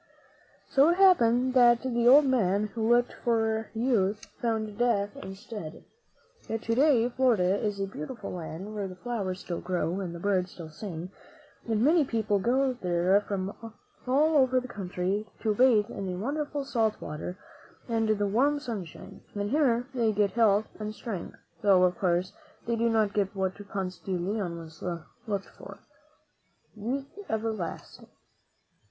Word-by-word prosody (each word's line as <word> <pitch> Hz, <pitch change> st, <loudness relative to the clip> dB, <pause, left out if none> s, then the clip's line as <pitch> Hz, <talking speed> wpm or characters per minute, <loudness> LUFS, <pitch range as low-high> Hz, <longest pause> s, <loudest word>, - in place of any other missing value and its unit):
So 280 Hz, +4 st, +5 dB
it 345 Hz, -, +2 dB
happened 255 Hz, -10 st, +5 dB
that 240 Hz, -2 st, +5 dB
the 240 Hz, -2 st, +1 dB
old 280 Hz, +4 st, +8 dB
man 210 Hz, -5 st, +2 dB
who 225 Hz, -1 st, -1 dB
looked 240 Hz, +1 st, +3 dB
for 225 Hz, -2 st, +1 dB
youth 220 Hz, -4 st, +1 dB, 0.2 s
found 220 Hz, -2 st, -2 dB
death 220 Hz, -2 st, +1 dB
instead. 195 Hz, -, -8 dB, 0.6 s
Yet, 225 Hz, 0 st, -3 dB
to 230 Hz, -, 0 dB
day, 255 Hz, -2 st, +4 dB
Florida 225 Hz, -7 st, +2 dB
is 205 Hz, -2 st, -1 dB
a 195 Hz, -, 0 dB
beautiful 195 Hz, -, -7 dB
land, 180 Hz, +4 st, -6 dB
where 205 Hz, -2 st, -3 dB
the 185 Hz, -, -9 dB
flowers 195 Hz, -4 st, -4 dB
still 175 Hz, -, -5 dB
grow 180 Hz, 0 st, -1 dB
and 175 Hz, -3 st, -4 dB
the -, -, -7 dB
birds 185 Hz, -1 st, 0 dB
still 160 Hz, -3 st, -9 dB
sing, 175 Hz, 0 st, -7 dB, 0.6 s
and 220 Hz, 0 st, +2 dB
many 315 Hz, +3 st, +5 dB
people 220 Hz, -5 st, 0 dB
go 260 Hz, +5 st, +2 dB
there 180 Hz, -2 st, +2 dB
from 200 Hz, -1 st, -3 dB, 0.6 s
all 300 Hz, +4 st, +3 dB
over 260 Hz, -2 st, +4 dB
our 255 Hz, -, +1 dB
country 195 Hz, -1 st, -3 dB
to 215 Hz, -2 st, +1 dB
bathe 220 Hz, -2 st, +4 dB
in 195 Hz, -, -5 dB
the 180 Hz, -, -3 dB
wonderful 290 Hz, +5 st, -3 dB
salt 225 Hz, -5 st, 0 dB
water 150 Hz, +5 st, -6 dB, 0.5 s
and 225 Hz, -2 st, 0 dB
the 205 Hz, -1 st, +2 dB
warm 270 Hz, +9 st, +2 dB
sunshine, 215 Hz, -, -7 dB
and 205 Hz, +1 st, -2 dB
here 255 Hz, -5 st, +2 dB
they 230 Hz, -4 st, +2 dB
get 205 Hz, -1 st, +1 dB
health 220 Hz, -2 st, +3 dB
and 215 Hz, 0 st, -5 dB
strength, 205 Hz, -7 st, -6 dB, 0.2 s
though, 195 Hz, -3 st, +5 dB
of 180 Hz, 0 st, +3 dB
course, 180 Hz, 0 st, +1 dB, 0.3 s
they 235 Hz, -, 0 dB
do 230 Hz, +1 st, +1 dB
not 215 Hz, -3 st, +2 dB
get 200 Hz, -1 st, 0 dB
what 190 Hz, -1 st, 0 dB, 0.2 s
Ponce 185 Hz, -2 st, -4 dB
de 190 Hz, -2 st, -3 dB
Leon 175 Hz, -3 st, -3 dB, 0.6 s
looked 200 Hz, -2 st, -3 dB
for -, -, -12 dB, 0.5 s
— -, -, -41 dB
youth 250 Hz, +6 st, -3 dB, 0.2 s
everlasting. 220 Hz, -6 st, -4 dB
215 Hz, 160 wpm, -28 LUFS, 190-240 Hz, 0.6 s, old